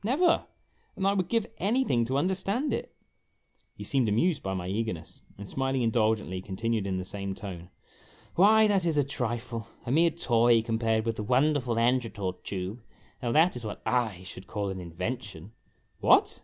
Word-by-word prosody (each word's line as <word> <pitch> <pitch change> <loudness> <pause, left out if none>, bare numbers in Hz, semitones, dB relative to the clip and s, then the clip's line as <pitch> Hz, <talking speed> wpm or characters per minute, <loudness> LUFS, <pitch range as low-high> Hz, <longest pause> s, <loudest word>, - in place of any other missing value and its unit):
" - - -31
Never! 300 - +2 0.5
And 195 - -2
I 195 - +4
would 185 -3 0
give 230 -2 +1
anything 200 - +2
to 130 +3 -1
understand 195 - 0
it! - - -4 0.4
" - - -42
He - - -7
seemed 130 -5 +1
amused 145 - +2
by 95 0 -3
my 90 -1 -4
eagerness, 100 -3 -4 0.2
and, 100 0 -8
smiling 135 +1 -1
indulgently, 110 -5 +1
continued 105 +2 -2
in 95 -1 -1
the 90 - -4
same 100 0 -4
tone: 90 -5 -8 0.6
"Why, 215 +4 +6
that 200 -3 +2
is 165 -3 +1
a 145 - +4
trifle 120 -3 -3 0.2
a 120 - -2
mere 165 +4 +5
toy 120 -7 +3
compared 110 -1 0
with 115 -1 -1
the - - -2
wonderful 130 +1 +2
Angertort 115 -5 0
Tube. 95 +4 -4 0.4
Now, 120 -2 -1
that 165 +4 +4
is 120 - -6
what 105 - -6 0.3
/ 90 - -13
should 90 +1 -9
call 100 -2 -2
an 95 - -5
invention 90 +2 -5 0.2
/ - - -40
" - - -43
"What! - - +4
115 Hz, 185 wpm, -28 LUFS, 100-155 Hz, 0.6 s, Why